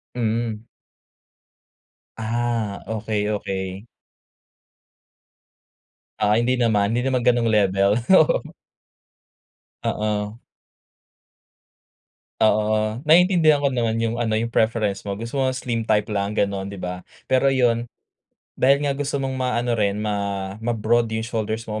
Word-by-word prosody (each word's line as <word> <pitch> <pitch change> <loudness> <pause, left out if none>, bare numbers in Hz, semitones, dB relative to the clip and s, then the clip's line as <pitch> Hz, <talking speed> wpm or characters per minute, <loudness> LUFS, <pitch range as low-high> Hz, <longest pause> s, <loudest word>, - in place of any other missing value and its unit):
Mhm. 115 -1 -2 1.5
Ah, 115 -2 -2
okey, 110 -1 -2
okey. 95 0 -4 2.3
Ah, 105 -1 +3
hindi 120 +3 +2
naman, 110 -4 +2
hindi 125 - -1
naman 130 -2 +1
ganong 120 -1 +2
level. 100 -2 +3 0.2
Oo. 160 - +3 1.4
Oo. 105 +1 -2 2.0
Oo 110 +1 +2
naiintindihan 160 0 +5
ko 140 -1 0
naman 115 -2 0
yung 115 +1 -1
ano 110 -2 0
yung 115 +1 -3
preference 110 -3 +1
mo. 100 -1 -5
Gusto 115 +5 -3
mo 130 - +2
slim 125 -3 -2
type 105 -1 +3
lang 100 +1 -2
ganon, 100 -1 -1
'di 100 - -8
ba? 90 0 -5 0.2
Pero 130 +1 +3
yun, 120 -3 +1 0.7
dahil 140 +3 +4
nga 140 - +1
gusto 140 +1 -2
mong 135 -1 -2
maano 120 -1 0
rin 105 -3 +1
ma 100 -2 -2
ma-broad 115 0 +1
yung 110 0 -3
shoulders 110 -1 -3
mo 110 -1 -4
110 Hz, 120 wpm, -22 LUFS, 105-120 Hz, 2.3 s, naiintindihan